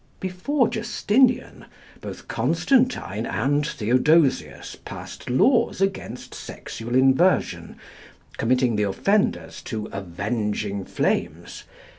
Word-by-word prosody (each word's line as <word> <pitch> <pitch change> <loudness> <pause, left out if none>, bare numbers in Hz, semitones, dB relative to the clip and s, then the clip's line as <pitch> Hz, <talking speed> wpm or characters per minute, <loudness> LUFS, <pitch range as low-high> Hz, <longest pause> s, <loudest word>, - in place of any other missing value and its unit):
Before 220 +9 0
Justinian, 240 +3 +1 0.4
both - - -8
Constantine 250 - +1
and 140 +8 +1
Theodosius 130 +4 +1
passed - - -9
laws 230 - +3
against 195 0 -3
sexual 120 +2 -6
inversion, 135 +8 +2 0.6
committing 125 -1 +2
the - - +1
offenders 195 - 0
to 110 -2 -4
"avenging 100 +1 -3
flames." - - -2
130 Hz, 85 wpm, -24 LUFS, -, 0.6 s, laws